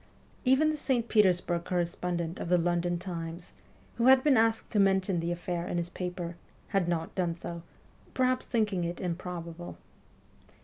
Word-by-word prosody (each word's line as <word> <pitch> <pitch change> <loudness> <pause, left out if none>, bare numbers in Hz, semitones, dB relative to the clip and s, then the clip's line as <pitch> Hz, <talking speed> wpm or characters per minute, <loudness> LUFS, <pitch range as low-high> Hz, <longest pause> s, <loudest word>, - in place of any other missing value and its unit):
Even 270 +5 +4
the 310 - -3
St. 250 -5 0
Petersburg 180 -5 +3
correspondent 175 -1 -2
of - - -4
the 180 - +5
London 175 0 +1
Times, 170 -1 -6 0.4
who 235 +1 +3
had 260 0 +7
been 290 -3 +5
asked 225 -1 +2
to 210 - +2
mention 190 -2 +3
the 170 +1 -1
affair 175 0 -3
in - - -2
his 170 0 -2
paper, 180 -2 -5 0.3
had 195 -4 +1
not 165 -2 -2
done 175 -3 -1
so, 170 0 -6 0.5
perhaps 255 0 +1
thinking 210 -6 +1
it 170 +1 -3
improbable. 175 -1 -5
180 Hz, 160 wpm, -30 LUFS, 170-210 Hz, 0.5 s, had